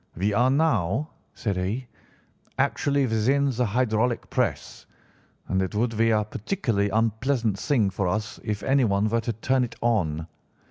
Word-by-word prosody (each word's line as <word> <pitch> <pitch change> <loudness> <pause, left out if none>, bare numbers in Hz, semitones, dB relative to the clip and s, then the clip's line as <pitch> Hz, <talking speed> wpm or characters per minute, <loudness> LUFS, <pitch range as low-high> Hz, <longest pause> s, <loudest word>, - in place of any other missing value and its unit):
"'We 100 +5 0
are 120 +5 +3
now,' 135 - +1 0.3
said 100 -4 -2
he, 105 +8 -2 0.7
'actually 140 -1 +1
within 130 +5 +2
the 125 -1 0
hydraulic 120 +1 0
press, - - -2 0.6
and 95 0 +1
it 95 +2 -3
would 115 +1 0
be 115 +1 +3
a 105 -1 +3
particularly 110 - -1
unpleasant 115 0 0
thing 115 -10 +1
for 95 0 -1
us 105 +4 -2
if 105 -2 -3
anyone 115 -7 +2
were 115 +1 +1
to 115 +1 -2
turn 130 +4 +1
it 115 -2 -5
on. 85 -10 0
115 Hz, 150 wpm, -25 LUFS, 100-125 Hz, 0.7 s, are